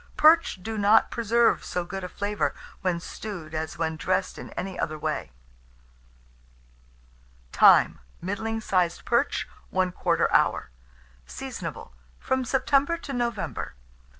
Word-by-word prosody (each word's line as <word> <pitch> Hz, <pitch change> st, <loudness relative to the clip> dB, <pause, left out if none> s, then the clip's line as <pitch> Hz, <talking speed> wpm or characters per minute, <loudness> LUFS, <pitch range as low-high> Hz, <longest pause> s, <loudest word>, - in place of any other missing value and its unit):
Perch 320 Hz, -, +5 dB
do 220 Hz, +1 st, -3 dB
not 205 Hz, +2 st, +5 dB
preserve 235 Hz, 0 st, +2 dB
so 180 Hz, -1 st, -3 dB
good 195 Hz, +2 st, -6 dB
a 180 Hz, -, -5 dB
flavour 205 Hz, +2 st, -1 dB, 0.3 s
when 180 Hz, -3 st, 0 dB
stewed 175 Hz, -4 st, -7 dB
as 155 Hz, 0 st, -3 dB
when 160 Hz, -1 st, -1 dB
dressed 185 Hz, +3 st, -1 dB
in -, -, -8 dB
any 190 Hz, 0 st, -5 dB
other 155 Hz, -1 st, -2 dB
way. 110 Hz, -, -3 dB, 2.2 s
Time. -, -, +6 dB, 0.2 s
Middling 220 Hz, +4 st, -3 dB
sized 180 Hz, -5 st, 0 dB
perch, 240 Hz, +4 st, +1 dB, 0.2 s
1/4 180 Hz, -2 st, +1 dB
hour. -, -, +2 dB, 0.6 s
Seasonable -, -, -7 dB, 0.2 s
from 260 Hz, 0 st, -1 dB
September 275 Hz, +5 st, +2 dB
to 280 Hz, -, -7 dB
November. 235 Hz, -, -3 dB
200 Hz, 120 wpm, -26 LUFS, 175-235 Hz, 2.2 s, Time